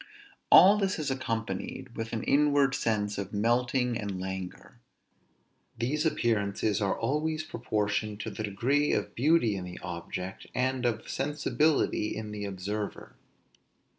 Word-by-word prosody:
All 200 +3 +8
this 195 -1 0
is 150 -3 -2
accompanied 115 0 -4
with 115 0 -4
an 115 - -3
inward 145 -1 +3
sense 105 -4 0
of 100 +1 -5
melting 120 +2 +1
and 100 -3 -4
languor. 95 -1 -6 1.0
These 145 +7 0
appearances 105 -5 0
are 100 -1 +1
always 155 +2 0
proportioned 105 -5 -2
to - - -4
the - - -6
degree 125 +8 +1
of - - -1
beauty 130 -5 +3
in 95 - -4
the 90 0 -8
object, 90 +1 -6
and 130 0 +1
of 115 -2 -2
sensibility 145 -4 +1
in 110 -1 -5
the 105 -1 -4
observer. 100 +2 -5
115 Hz, 135 wpm, -29 LUFS, 100-135 Hz, 1.0 s, All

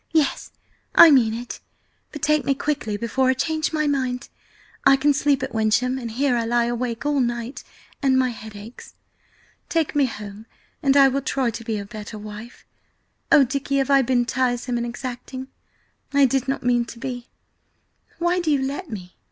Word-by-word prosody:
"Yes, 310 -4 +1 0.5
I 330 - +10
mean 245 -6 +5
it! 240 +1 -7 0.5
But 295 - -9
take 305 -1 +3
me 275 - +1
quickly 265 -8 -2
before 255 +4 0
I 260 - +3
change 315 +3 -1
my 305 -1 0
mind! 260 -3 -1 0.5
I 275 - +7
can 285 +2 +3
sleep 280 -1 +1
at 265 - -4
Wyncham, 230 +4 +1
and 235 -2 -5
here 255 +3 +1
I 235 - 0
lie 235 +1 +1
awake 240 +1 -3
all 290 -1 +1
night, 240 +1 -2 0.4
and 265 -2 +3
my 260 -1 +2
head 220 -2 -10
aches. 210 +4 -11 0.7
Take 325 -3 0
me 285 -2 +4
home 210 -1 -9 0.3
and 275 -2 +3
I 275 -1 +8
will 270 +1 0
try 265 -4 0
to 230 +1 -7
be 225 -1 -2
a 200 - -5
better 215 0 -8
wife! 215 +3 -10 0.7
Oh, 290 - +8
Dicky, 275 +2 -1
have 270 0 +1
I 275 -1 +6
been 245 -1 +1
tiresome 245 -1 -1
and 235 0 -2
exacting? 255 +1 -7 0.6
I 280 0 +5
did 265 +1 0
not 270 - -2
mean 240 -1 +2
to 235 - -10
be! 245 -1 -6 0.9
Why 345 +1 +1
do 345 -3 -1
you 280 -3 +2
let 285 +6 -4
me?" 185 -5 -8
255 Hz, 185 wpm, -23 LUFS, 235-275 Hz, 0.9 s, I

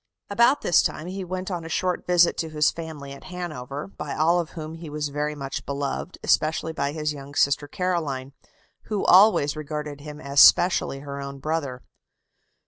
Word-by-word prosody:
About 235 +7 +4
this 175 - +4
time 155 - -3
he 190 +2 -5
went 185 +1 -4
on 175 -2 -3
a 165 - -7
short 180 +2 -1
visit 175 -1 +4
to 160 - -2
his 150 -1 +2
family 155 -4 -8
at 140 - -13
Hanover, 155 -7 -6
by 195 - -6
all 170 +3 +3
of 170 -2 -3
whom 155 0 -6
he 165 -1 -8
was 150 0 -3
very 150 +1 -2
much 135 -2 -5
beloved, 140 +5 -4
especially 160 +1 +1
by 140 -2 -1
his 150 0 -2
young 140 0 -10
sister 140 +1 +2
Caroline, 145 -7 -2 0.5
who 210 -3 -2
always 185 -7 +6
regarded 150 -1 -5
him 150 0 -9
as 140 -1 0
specially 155 -6 +6
her 140 -1 -6
own 140 0 -6
brother. 140 -4 -3
155 Hz, 180 wpm, -25 LUFS, 140-175 Hz, 0.5 s, always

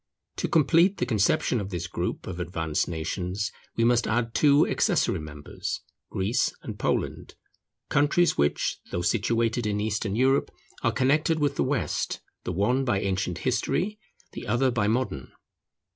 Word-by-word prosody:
To - - -1
complete 170 +5 +4
the - - 0
conception 110 +2 +2
of 100 - -5
this 90 -2 -3
group 90 -1 -3
of 90 -1 -6
advanced 80 -3 -1
nations, 90 +4 -3 0.2
we 115 - +1
must 120 0 +3
add 115 +1 0
two 145 0 +5
accessory - - +1
members, 75 -1 -6 0.3
Greece 110 +7 0
and - - -7
Poland, - - -2 0.5
countries 145 +5 +3
which, 70 0 0
though 85 - -2
situated 115 +3 +1
in 105 0 0
Eastern 105 -1 -1
Europe, 130 +3 +3 0.3
are - - +2
connected 155 +5 +2
with 145 -2 +1
the - - +1
West, 130 0 -1 0.3
the - - -2
one 105 +9 +1
by 120 -7 +1
ancient 95 -3 -1
history, 175 - 0 0.3
the - - -8
other 130 +1 +2
by 110 -4 +1
modern. 110 - -1
115 Hz, 150 wpm, -26 LUFS, 95-130 Hz, 0.5 s, two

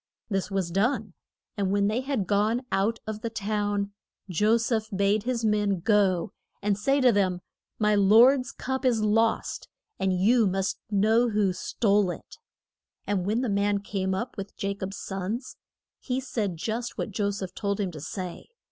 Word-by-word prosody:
This 195 0 -1
was 190 -3 -1
done, 215 +1 0 0.4
and 200 -2 0
when 200 +1 +2
they 220 +4 0
had 260 -7 -1
gone 215 +6 +1
out 200 +4 +1
of 215 -1 -5
the 230 - -2
town 205 -2 -1 0.4
Jo 210 +6 +3
seph 225 -1 -1
bade 200 +1 +1
his 240 -2 -1
man 210 -3 +1
go 195 -3 +2 0.3
and 205 0 +1
say 270 +8 +1
to 255 -1 +6
them: 190 -4 +1 0.4
My 210 -1 +2
lord's 235 +6 +5
cup 265 +1 -4
is 235 -4 +2
lost, 225 +2 +1 0.3
and 190 - +1
you 210 +5 +3
must 190 +1 -1
know 220 +4 +3
who 205 -3 +1
stole 200 +1 +1
it. 175 - -8 0.7
And 195 -3 -1
when 220 +4 +1
the 255 - -1
man 200 0 +1
came 190 -2 -2
up 235 +6 -4
with 195 0 -6
Ja 200 0 -1
cob's 195 0 -6
sons, 195 +6 -4 0.4
he 255 -1 -2
said 215 -9 -3
just 225 +7 -3
what - - -3
Jo 200 +1 0
seph 195 -2 -5
told 200 -1 -2
him 195 -3 -1
to 155 -3 -9
say. 180 +2 -6
205 Hz, 175 wpm, -27 LUFS, 195-225 Hz, 0.7 s, to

